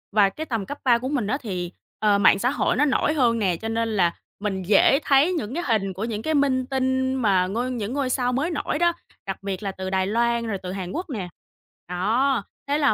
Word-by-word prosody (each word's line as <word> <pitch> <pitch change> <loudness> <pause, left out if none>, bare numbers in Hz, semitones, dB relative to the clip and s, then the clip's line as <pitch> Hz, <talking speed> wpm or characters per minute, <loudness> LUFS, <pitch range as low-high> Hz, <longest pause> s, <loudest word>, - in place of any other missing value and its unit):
và 200 -2 +5
cái 315 +9 -6
tầm 230 -8 -2
cấp 285 - -6
3 245 -3 +5
của 255 +2 -4
mình 250 -8 -1
á 270 - 0
thì, 180 -6 -4 0.3
ờ, 210 -2 +3
mạng 200 -1 +5
xã 245 +4 +2
hội 285 - 0
nó 295 - +3
nổi 295 +2 +1
hơn 240 -6 +2
nè, 190 -5 +1
cho 225 - -6
nên 230 0 0
là 175 -2 +3 0.3
mình 195 -2 -2
dễ 210 - +5
thấy 285 +6 +4
những 250 -8 -3
cái 345 +4 -2
hình 195 -5 +1
của 190 - -5
những 220 -2 -3
cái 315 +6 -1
minh 270 -3 +2
tinh 260 0 0
mà 195 -7 +2
ngôi 240 +6 -2
những 230 -2 -3
ngôi 280 -2 -1
sao 250 -1 0
mới 300 +7 0
nổi 300 0 -2
đó, 345 0 +3 0.3
đặc 195 0 -5
biệt 195 0 -4
là 195 - -2
từ 190 0 -5
Đài 190 0 0
Loan 235 +2 +1
rồi 210 -3 -2
từ 180 - -4
Hàn 185 -2 -5
Quốc 350 +2 -4
nè. 205 -10 -4 0.6
Đó, 225 +7 +1 0.2
thế 285 +1 +1
là 285 -6 +3
235 Hz, 245 wpm, -24 LUFS, 195-270 Hz, 0.6 s, và